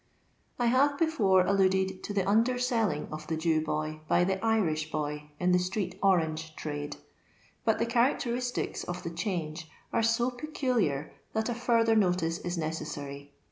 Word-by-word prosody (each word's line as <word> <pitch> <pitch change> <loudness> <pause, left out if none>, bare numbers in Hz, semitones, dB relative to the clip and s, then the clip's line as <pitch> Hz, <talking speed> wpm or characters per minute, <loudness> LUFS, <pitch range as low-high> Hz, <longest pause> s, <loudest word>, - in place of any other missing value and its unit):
I 245 - +1
haTe 280 +4 +3
befbire 200 - +3
alluded 190 -1 +2
to - - -4
the 195 -2 0
underselling 230 - +2
of 155 0 -7
the 160 - -1
Jew 160 -1 +2
boy 155 0 -2
by 175 - +4
the 190 +2 -1
Irish 165 -9 +1
boy 150 -1 -3
in 180 0 +2
the 180 - +5
street 185 0 -3
orange 160 -4 +1
trade; 145 -1 -5 0.7
but 225 - +3
the 230 - +1
characteristics 245 +1 0
of 175 0 -5
the 170 - -4
change 165 -3 -3 0.2
are - - +3
so 230 +2 +2
peculiar, 245 - -1 0.2
that 220 +2 0
a - - 0
further 230 -1 +2
notice 180 -5 +2
is 175 0 -3
necessary. 145 -3 -5
185 Hz, 155 wpm, -29 LUFS, 155-230 Hz, 0.7 s, the